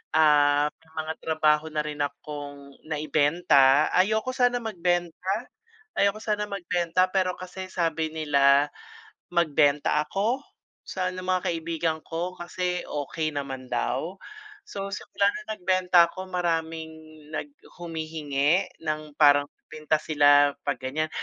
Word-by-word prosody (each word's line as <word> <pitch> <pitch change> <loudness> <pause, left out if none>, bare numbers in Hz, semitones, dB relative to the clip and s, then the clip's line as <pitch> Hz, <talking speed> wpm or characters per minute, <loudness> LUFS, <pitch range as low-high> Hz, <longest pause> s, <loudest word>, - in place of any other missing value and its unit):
Ah, 145 -1 +5
may 160 - -28 0.2
mga 160 - -3
trabaho 155 -1 +2
na 150 0 0
rin 150 -1 -6
akong 145 -1 -7
naibenta 150 -2 +3
ayoko, 220 +6 +2
sana 245 -1 +2
magbenta, 175 -5 -1 0.9
ayoko 200 +1 +2
sana 210 -1 -1
magbenta 180 -1 +1
pero 185 -1 +1
kasi 185 +1 -7
sabi 160 -3 -1
nila 140 -2 +4 0.7
magbenta 150 -3 +2
ako 210 - -1 0.4
sa 185 -1 -2
mga 185 0 -1
kaibigan 165 -1 -2
ko 170 +2 -4
kasi 180 0 -3
okey 155 +2 -3
naman 135 -3 -5
daw. 130 +9 -2 0.5
So 195 0 -5
simulan 200 +1 0
na - - -3
nagbenta 180 -2 +4
ako 185 +1 -8
maraming 165 -2 -2 0.4
nag 155 - -4 0.3
humihingi 160 0 0 0.2
ng 155 -1 -3
parang 145 -1 +6 0.2
pinta 155 0 0
sila 145 -2 +5
'pag - - -2
ganyan. 145 +5 -2
160 Hz, 120 wpm, -26 LUFS, 150-180 Hz, 0.9 s, parang